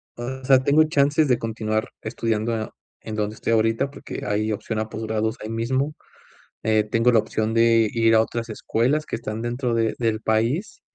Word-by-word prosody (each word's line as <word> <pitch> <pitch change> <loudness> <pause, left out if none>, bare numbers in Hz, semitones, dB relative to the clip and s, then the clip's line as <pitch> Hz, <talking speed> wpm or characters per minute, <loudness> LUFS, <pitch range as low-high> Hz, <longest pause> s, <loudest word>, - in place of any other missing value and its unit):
o 130 +2 -6
sea, 130 -1 +5
tengo 150 +4 +5
chances 150 0 +2
de 125 - +2
continuar 110 -1 -2
estudiando 110 0 -2 0.3
en 110 -1 -6
donde 105 0 -1
estoy 115 - -1
ahorita 115 +5 +2
porque 140 - -8
hay 105 +1 0
opción 110 +1 -3
a 110 0 -2
posgrados 110 0 -2
ahí 110 - -6
mismo, 130 +6 -1 0.7
eh, 110 -1 +2
tengo 115 +3 +2
la 115 - +5
opción 110 +1 -1
de 115 -1 +4
ir 115 -1 +3
a 110 - +6
otras 115 +1 -3
escuelas 120 +6 0
que - - -4
están 110 -1 -5
dentro 120 +1 -2
de 115 -1 +1
del 115 -2 0
país 115 - 0
115 Hz, 180 wpm, -23 LUFS, 110-125 Hz, 0.7 s, a